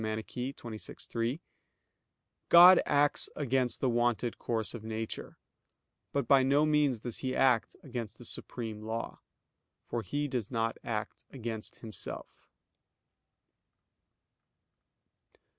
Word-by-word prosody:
xxvi, 110 +1 -5
3): 120 +7 -1 1.1
"God 175 +2 +10
acts 145 0 +3
against 130 -3 0
the 130 - +2
wonted 120 0 0
course 115 -2 -2
of 120 -3 -7
nature, 110 0 -5 0.7
but 140 - -1
by 140 -2 +6
no 140 +3 +4
means 150 -6 +2
does 120 -2 -3
He 130 -1 -2
act 125 -4 +3
against 115 -5 -6
the 120 - -11
supreme 110 -3 -5
law; 110 +1 -4 0.7
because 115 -5 -2
He 145 +7 -1
does 125 -6 -3
not 115 -2 -1
act 110 -2 -4
against 115 -4 -5
Himself." 110 -3 -7
120 Hz, 110 wpm, -31 LUFS, 110-135 Hz, 1.1 s, God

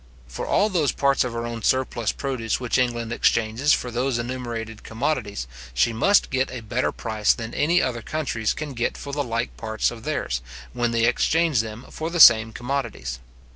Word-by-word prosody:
For - - -6
all 210 +2 +3
those 165 -8 +1
parts 140 -1 +2
of 125 - -3
her 115 0 -3
own 115 -1 -5
surplus 120 -3 +1
produce 130 -5 -2
which 125 0 0
England 120 -2 -1
exchanges 115 +4 +2
for 125 - +1
those 125 +1 0
enumerated 120 -2 -5
commodities, 110 - -2 0.3
she 115 - +3
must 200 - +3
get 130 0 +1
a 125 - -6
better 120 +4 -1
price 110 -2 +1
than 115 -1 -6
any 170 +4 +2
other 120 -2 -2
countries 120 -6 -2
can 150 -1 -6
get 120 -1 -2
for 140 - -7
the 145 0 0
like 115 -1 -3
parts 110 -1 -1
of 115 -2 -10
theirs, 90 - -2 0.3
when 120 -1 0
they 115 0 +2
exchange 155 +2 +2
them 110 +2 -8
for 160 +1 -4
the 170 0 -3
same 115 -5 +8
commodities. 120 - -4
120 Hz, 185 wpm, -24 LUFS, 115-135 Hz, 0.3 s, same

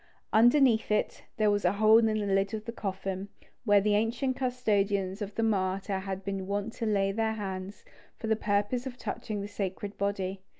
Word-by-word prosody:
Underneath 240 0 +5
it, 210 0 -1
there 215 -1 +3
was 205 0 0
a 180 - +3
hole 215 +2 +6
in 225 - +3
the 215 - +1
lid 200 0 0
of 215 0 -7
the 230 - -4
coffin, 195 -2 -4 0.4
where 205 -2 +6
the 205 +1 +1
ancient 235 +5 0
custodians 205 -6 0
of 205 0 -5
the 225 - 0
martyr 195 -2 0
had 190 0 -5
been 195 -1 -3
wont 205 +3 -2
to 230 - -3
lay 195 -2 +2
their 220 +2 0
hands, 195 -2 -6 0.3
for - - -7
the 220 0 +2
purpose 210 +5 0
of 250 -1 -7
touching 215 -4 -4
the 200 - -4
sacred 200 0 -5
body. 195 -1 -2
205 Hz, 195 wpm, -29 LUFS, 195-220 Hz, 0.4 s, hole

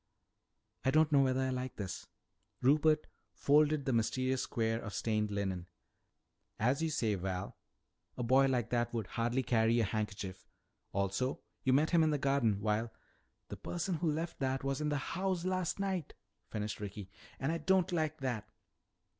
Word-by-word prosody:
"Don't 155 +3 +4
know 140 -2 +6
whether 130 -1 +2
I - - +2
exactly 130 -1 0
like 130 -1 -6
this." 95 -3 -5 0.5
Rupert 155 +3 +4 0.3
folded 150 0 +3
the 130 - +1
mysterious 130 +3 +1
square 115 -2 0
of 105 - -6
stained 110 -2 0
linen. 95 -3 -2 0.9
"As 125 +7 +2
you 165 - +1
say, 115 -8 +1
Val, 95 -1 -3 0.6
a 125 - -2
boy 130 +3 +5
like 125 -3 0
that 120 -1 0
would 110 -3 -1
hardly 120 +5 -1
carry 115 -1 +3
a - - +3
handkerchief. 100 -3 -3 0.4
Also, 100 +7 -1 0.2
you 130 - +3
met 145 +4 +3
him 170 -2 +5
in 160 - +4
the 150 - +2
garden, 130 -7 +2
while 110 +2 0 0.3
" - - -46
"The - - -6
person 175 0 -2
who 165 -1 +1
left 165 +3 -3
that 130 0 -1
was 135 +1 -1
in 150 - 0
this 145 -1 0
house 185 +2 -2
last 185 -2 0
night!" 190 -6 -2 0.3
finished 105 -1 -3
Ricky. 100 -2 -7 0.3
"And 135 +4 0
I 165 - -1
don't 190 +3 +2
like 155 -5 -1
that!" 120 -6 -2
130 Hz, 170 wpm, -34 LUFS, 110-150 Hz, 0.9 s, know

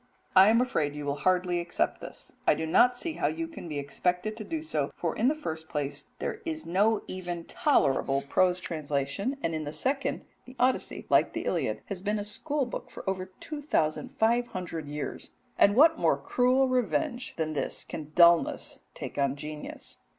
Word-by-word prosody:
I 190 +2 +9
am 230 +2 +5
afraid 150 - 0
you 150 -1 -5
will 140 0 -1
hardly 180 +1 +2
accept 170 0 -1
this; - - -10
I - - +6
do 160 - -2
not 245 +10 +4
see 330 +5 -3
how - - 0
you 330 0 -2
can 325 - -9
be 150 - -3
expected 180 +9 -1
to 220 - -5
do 315 +7 -4
so, 320 - -1
for - - -2
in 235 - +2
the 295 - +3
first 160 - -6
place 145 -1 -3
there - - -4
is 315 -2 -4
no 205 +5 +2
even 175 -2 -5
tolerable 140 - +2
prose 180 +4 +3
translation, 155 - -2
and 165 - 0
in 155 -1 -2
the 145 - -4
second, 275 - -1 0.2
the 255 - -13
Odyssey, 255 +1 0
like - - +4
the - - -3
Iliad, - - -1
has 195 -3 -5
been 210 +2 0
a 205 - -2
school 280 +7 -1
book 240 - -6
for - - -10
over 190 -1 -1
two 305 -2 -6
thousand 255 - -1
five 235 +1 +3
hundred 170 -7 -5
years, 145 0 -5 0.3
and 205 - +5
what 320 +5 +6
more - - +3
cruel 255 +2 +2
revenge 255 +1 -1
than 155 -1 -2
this 140 -3 -2
can 155 -1 -7
dullness 170 -1 +4 0.2
take - - -6
on 140 -1 +2
genius? 150 +1 -8
185 Hz, 195 wpm, -28 LUFS, 155-255 Hz, 0.3 s, I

